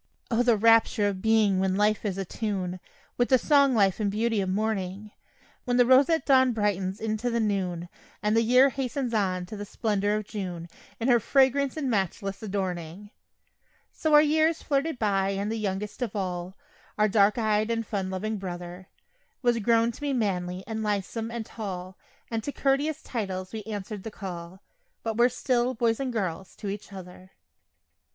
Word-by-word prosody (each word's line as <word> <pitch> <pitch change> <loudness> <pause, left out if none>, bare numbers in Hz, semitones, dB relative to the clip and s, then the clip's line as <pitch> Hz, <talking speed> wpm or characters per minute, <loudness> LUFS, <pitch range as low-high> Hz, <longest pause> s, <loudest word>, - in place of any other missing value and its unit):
O, 230 +1 +3
the 240 -3 +3
rapture 225 -1 +4
of 195 -2 -3
being 215 -3 +3
when 190 0 +1
life 210 +1 +2
is 195 -2 -2
a 195 - -3
tune 185 -3 -3 0.4
With 245 - +2
the 260 - +6
song 280 -1 +4
life 195 -3 +3
and 210 -2 +1
beauty 220 +1 0
of 190 - -2
morning; 205 0 -2 0.5
When 245 -1 +1
the 245 - +6
roseate 275 +6 +4
dawn 260 -2 +5
brightens 195 -3 -1
into 220 +2 -2
the 235 0 0
noon, 185 -5 -1 0.4
And 210 +1 +2
the 230 - +5
year 250 +4 +5
hastens 265 -1 -3
on 185 -4 0
to 195 - -8
the 205 - -5
splendor 205 0 -1
of 215 -1 -3
June, 180 -5 -5 0.3
In 230 - -1
her 240 -2 +5
fragrance 270 +3 +2
and 290 -3 -2
matchless 195 -2 -2
adorning. 190 -2 -4 0.8
So 310 -1 +2
our 295 - +8
years 315 +2 +2
flitted 285 0 0
by 195 -3 +1
and 205 +2 -2
the - - -1
youngest 205 +2 -3
of 225 -4 -3
all 180 -1 -3 0.4
Our 215 0 +4
dark 205 +1 +3
eyed 215 -1 +1
and 230 -1 -1
fun 195 -3 -3
loving 215 +3 -3
brother 180 0 -7 0.6
Was 240 -1 +3
grown 230 +1 +3
to 230 - -14
be 290 -1 -1
manly 185 -6 -1
and 220 -1 -4
lithesome 210 +2 -2
and 235 -1 -5
tall, 190 -5 -6 0.4
And 225 -1 -2
to 285 - -3
couteous 285 +3 0
titles 190 -5 -4
we 220 - -4
answered 210 -1 -5
the 220 - -6
call, 185 -2 -8 0.4
But 225 -1 -2
were 240 +2 +4
still 250 0 0
"boys" 230 -1 +1
and 265 -2 -2
"girls" 190 -5 -3
to 205 - -6
each 205 +1 -6
other. 185 0 -11
215 Hz, 180 wpm, -27 LUFS, 190-235 Hz, 0.8 s, our